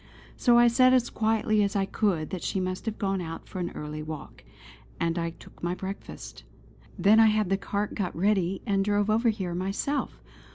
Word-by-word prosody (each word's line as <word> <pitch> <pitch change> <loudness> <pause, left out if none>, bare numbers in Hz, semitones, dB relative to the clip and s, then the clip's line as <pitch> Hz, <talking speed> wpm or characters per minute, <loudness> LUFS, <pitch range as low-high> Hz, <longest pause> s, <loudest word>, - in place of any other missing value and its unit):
So 240 -2 +4
I 240 0 +7
said 255 +2 +5
as 245 -2 +1
quietly 220 -1 +1
as 200 0 0
I 195 -1 +2
could 185 -6 -1
that 185 - -4
she 195 - -1
must 185 +4 -3
have 220 - -2
gone 195 -2 -1
out 165 -1 -7
for 185 - -7
an 175 - -2
early 150 0 -5
walk; 155 -1 -8 0.6
and 165 0 0
I 165 0 -1
took 165 - -16
my 175 +1 -1
breakfast. 195 +1 -8 0.5
Then 210 +3 +5
I 225 - +7
had 215 -3 +1
the - - +4
cart 200 +1 -3
got 190 -5 -3
ready, 190 0 +1
and 195 -1 +1
drove 205 +1 +1
over 230 +2 +3
here 190 -5 -2
myself. 195 +10 -2
195 Hz, 200 wpm, -27 LUFS, 180-215 Hz, 0.6 s, I